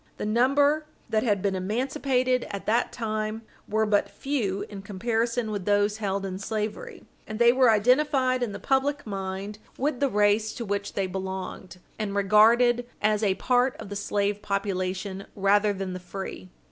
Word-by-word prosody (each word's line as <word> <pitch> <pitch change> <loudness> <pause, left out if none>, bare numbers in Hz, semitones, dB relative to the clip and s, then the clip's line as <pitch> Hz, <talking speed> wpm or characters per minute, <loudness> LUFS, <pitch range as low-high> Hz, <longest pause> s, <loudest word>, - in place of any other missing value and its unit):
The - - -4
number 285 +7 +3 0.2
that 220 - +2
had 205 -5 0
been 200 -1 +1
emancipated 250 +5 0
at 200 - -6
that 230 +3 +1
time 215 -1 -3 0.3
were 220 +1 +2
but 205 -1 +2
few 225 -9 -2
in 200 -2 -8
comparison 225 +3 -1
with 200 -3 -4
those 205 +1 +2
held 200 -2 -2
in 190 -1 -5
slavery, 215 +1 -4 0.2
and 215 - -5
they 235 +1 +6
were 255 -1 +5
identified 255 +3 +3
in 240 -4 -1
the - - -5
public 280 +2 0
mind 195 0 -5 0.2
with 280 -1 -1
the 280 - +2
race 210 0 +2
to 235 - -5
which 200 0 -3
they 195 - 0
belonged, 190 -1 -6 0.2
and 205 -2 -2
regarded 230 +5 +4
as 215 0 +2
a 200 -3 +2
part 250 +3 +2
of - - -9
the 205 - -5
slave 205 0 -1
population 195 -1 -3
rather 205 +1 +3
than 195 -2 -4
the 185 - -5
free. 180 - -7
210 Hz, 170 wpm, -26 LUFS, 195-240 Hz, 0.3 s, they